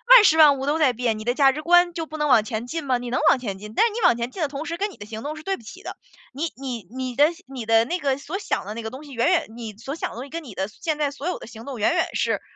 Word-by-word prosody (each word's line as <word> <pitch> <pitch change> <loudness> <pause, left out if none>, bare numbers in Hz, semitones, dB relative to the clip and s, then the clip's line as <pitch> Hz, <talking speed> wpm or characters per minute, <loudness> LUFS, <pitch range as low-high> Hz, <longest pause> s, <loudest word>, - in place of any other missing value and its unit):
万 470 - +9
事 320 -4 +5
万 295 -3 +7
物 270 - -4
都 300 +3 +1
在 290 -5 +5
变， 235 -2 -1
你 - - -6
的 240 +2 +1
价 270 -1 +5
值 305 - -5
观 350 +1 +5
就 330 -2 -3
不 310 0 -8
能 300 -1 0
往 245 -6 +5
前 225 0 -4
进 325 +4 -4
吗？ 260 -3 +1
你 245 0 -6
能 - - +1
往 - - +5
前 205 -6 -4
进， 210 +1 -9
但 - - +5
是 455 - 0
你 470 - -3
往 295 -9 +5
前 240 +1 -3
进 375 - -7
的 305 - +2
同 285 +3 -5
时， 335 - -3
跟 400 +4 -1
你 - - -15
的 205 - -9
行 220 +1 -7
动 305 +2 -4
是 305 - -10
对 390 0 -1
不 - - -15
齐 350 - -11
的， - - -6 0.4
你 300 +5 -3
你 245 -8 -6
你 255 -1 -4
的 290 +1 +6 0.2
你 260 -4 -7
的 225 0 +4
那 350 +8 -2
个 275 -4 0
所 305 +7 -5
想 400 - -2
的 210 - -5
那 230 - -5
个 220 - -4
东 260 +5 -10
西， 290 - -12
远 235 +4 +2
远 360 -2 +3
你 230 -3 -7
所 265 +5 -6
想 - - -3
的 - - -11
东 245 - -5
西 - - -13
跟 335 0 -5
你 230 -8 -11
的 190 - -1
现 300 +8 -3
在 295 -2 0
所 285 +3 -6
有 360 - -1
的 - - -9
行 225 0 -11
动 260 -2 -7
远 210 - +3
远 - - +1
是， - - 0
270 Hz, 375 characters per minute, -24 LUFS, 235-315 Hz, 0.4 s, 万